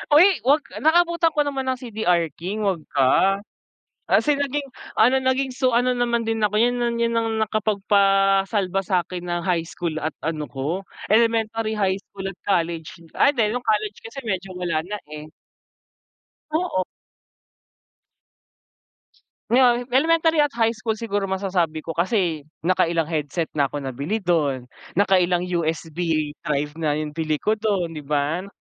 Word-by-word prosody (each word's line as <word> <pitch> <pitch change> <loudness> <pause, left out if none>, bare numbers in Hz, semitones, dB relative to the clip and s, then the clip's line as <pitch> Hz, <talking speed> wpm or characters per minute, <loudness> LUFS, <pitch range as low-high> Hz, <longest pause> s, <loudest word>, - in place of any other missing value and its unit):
Uy! 335 +5 +9 0.2
Wag 290 +2 +4 0.2
naka 330 +3 +5
abutan 340 -1 +1
ko - - 0
naman 270 -2 -3
ng 255 - -1
CDR 190 - 0
King 205 +5 -3
wag 185 -5 0
ka. 190 +9 +4 0.6
Kasi 295 -1 +3
naging 285 0 -2 0.3
ano 245 +4 +5
naging 260 0 +1
so, 255 -2 +2
ano 245 +1 +2
naman 235 -1 0
din 225 -1 0
ako 210 0 +1
yun 245 +1 +3
na 240 -1 0
yun 235 0 0
ang 225 -1 0
nakapagpa-salba 195 -2 +2
sakin 180 -1 -1
ng 175 -1 -2
high 170 -2 +1
school 165 -1 -4
at 155 - -1
ano 155 -1 -3
ko, 155 +9 -3 0.2
elementary, 225 0 +2
high 195 -3 +1
school 195 -1 -8
at 195 - -6
college, 170 -4 -1 0.2
ay 285 - +5
di 230 -6 +1
nung 245 +3 -3
college 215 -2 0
kasi 230 +5 -8
medyo 190 -1 -3
wala 165 -3 -1
na, 205 +3 -5
eh. 150 0 -9 1.2
Oo. 315 - 0 2.7
Yon, 245 -1 +4
elementary 325 +3 +3
at 290 -4 +2
high 225 -1 +3
school 220 -1 -3
siguro 205 -3 -2
masasabi 180 -5 -1
ko 165 - -4
kasi 170 -4 0 0.2
naka-ilang 170 -2 +2
headset 155 +2 -2
na 145 -2 +1
ako 145 0 -6
nabili 145 - -3
dun, 145 -7 +1 0.3
nakailang 180 -3 +3 0.2
USB 160 0 -3 0.5
drive 145 0 0
na 150 -2 +1
yung 155 0 -3
bili 155 0 -1
ko 215 - +2
dun, 195 -6 0
'di 150 -3 -8
ba? 150 +6 -1
195 Hz, 150 wpm, -23 LUFS, 165-235 Hz, 2.7 s, Uy